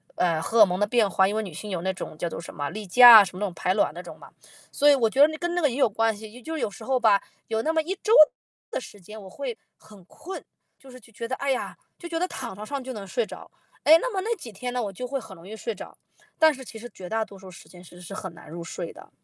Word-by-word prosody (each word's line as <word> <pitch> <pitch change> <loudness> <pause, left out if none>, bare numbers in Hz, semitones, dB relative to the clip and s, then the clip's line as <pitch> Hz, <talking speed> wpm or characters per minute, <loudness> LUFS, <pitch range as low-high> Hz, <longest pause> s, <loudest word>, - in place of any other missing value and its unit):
呃， 165 -3 +1
荷 225 +6 +2
尔 210 - +11
蒙 180 0 -3
的 205 - +2
变 225 -3 +2
化， 190 +1 +3
因 205 - -2
为 220 - -1
女 185 -6 -8
性 210 +6 -7
有 180 -4 -3
那 190 - -1
种 180 -4 -8
叫 170 - -2
做 - - -6
什 170 - -10
么， 145 -1 -3
例 210 +2 -7
假， 240 +2 +10
什 185 - -8
么 185 - -7
那 205 - +1
种 185 - -5
排 180 +2 0
卵 - - +1
那 - - -7
种 - - -11
嘛。 - - -14 0.4
所 290 +1 +4
以 285 - +7
我 230 -4 +2
觉 265 - -4
得 290 - +9
那 315 0 -6
跟 345 +1 -3
那 355 - 0
个 295 - +3
也 240 - -5
有 270 -5 +3
关 225 +1 +1
系， 215 0 -10
也 245 - -13
就 320 +7 -6
是 315 - -3
有 205 - -1
时 - - -11
候 265 0 +1
吧， 220 -5 +4 0.3
有 220 0 -1
那 320 - 0
么 320 - +2
1 350 +5 -3
周 435 - +1 0.6
的 - - -2
时 205 -5 -12
间， 215 +4 -11
我 190 - -11
会 250 +1 -6 0.2
很 205 -4 -17
困。 370 - -9 0.4
就 270 - -15
是 255 - -12
去 230 0 -20
觉 230 +2 -6
得， 245 - -5
哎 275 -1 -1
呀， 260 - -3 0.2
就 345 - -9
觉 330 - -2
得 360 - 0
躺 - - -6
床 210 +2 -8
上 280 +3 -4
就 260 - -6
能 205 -5 -7
睡 235 +4 -1
着。 - - -11 0.3
哎， 315 +2 +8
那 - - -2
么 385 - -1
那 450 +5 -1
几 250 - -10
天 245 +5 -5
呢， 245 - -1
我 205 - -4
就 250 +7 -6
会 275 +2 -2
很 220 -6 -9
容 170 0 -14
易 215 - -8
睡 465 - -4
着， - - -11 0.4
但 315 -1 +5
是 265 -1 -10
其 225 - -10
实 240 +2 -9
绝 185 - -9
大 220 +3 0
多 200 -2 -13
数 190 0 -12
时 180 - -14
间 180 -1 -14
其 180 - -16
实 175 0 -14
是 175 - -9
很 190 -2 -6
难 170 - -14
入 170 +2 -7
睡 170 0 -6
的。 - - -15
220 Hz, 345 characters per minute, -25 LUFS, 190-270 Hz, 0.6 s, 尔